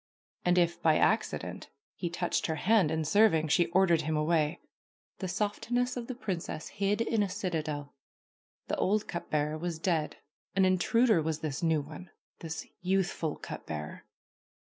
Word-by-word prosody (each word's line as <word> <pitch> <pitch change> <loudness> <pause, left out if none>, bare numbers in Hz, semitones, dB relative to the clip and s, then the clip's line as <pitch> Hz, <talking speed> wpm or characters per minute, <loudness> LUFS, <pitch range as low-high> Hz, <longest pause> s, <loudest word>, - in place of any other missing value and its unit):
And 180 0 +3
if, 170 -1 +2
by 160 -2 +4
accident, 220 +1 0 0.2
he 175 - -3
touched 175 +1 -1
her 160 - -1
hand 190 +1 +3
in 160 0 -1
serving 165 -4 +4
she 170 +3 +4
ordered 170 -2 +3
him 155 0 -1
away. 155 +1 +1 0.6
The 190 - -3
softness 220 +6 -1
of 240 -2 -5
the 255 - -4
princess 185 -9 -4
hid 200 +2 0
in 230 -1 +1
a 200 - +1
citadel. 155 -7 -3 0.7
The - - -1
old 210 +2 +1
cup 170 - -5
bearer 150 +1 0
was 170 -1 -3
dead. 160 -2 -1 0.4
An 190 -1 +4
intruder 205 +2 +3
was 160 0 -2
this 150 -3 -3
new 160 -3 +2
one, 155 +5 -10 0.3
this 160 -1 -5 0.2
youthful 180 -4 0
cup - - -8
bearer. 75 -1 -6
175 Hz, 160 wpm, -30 LUFS, 155-200 Hz, 0.7 s, by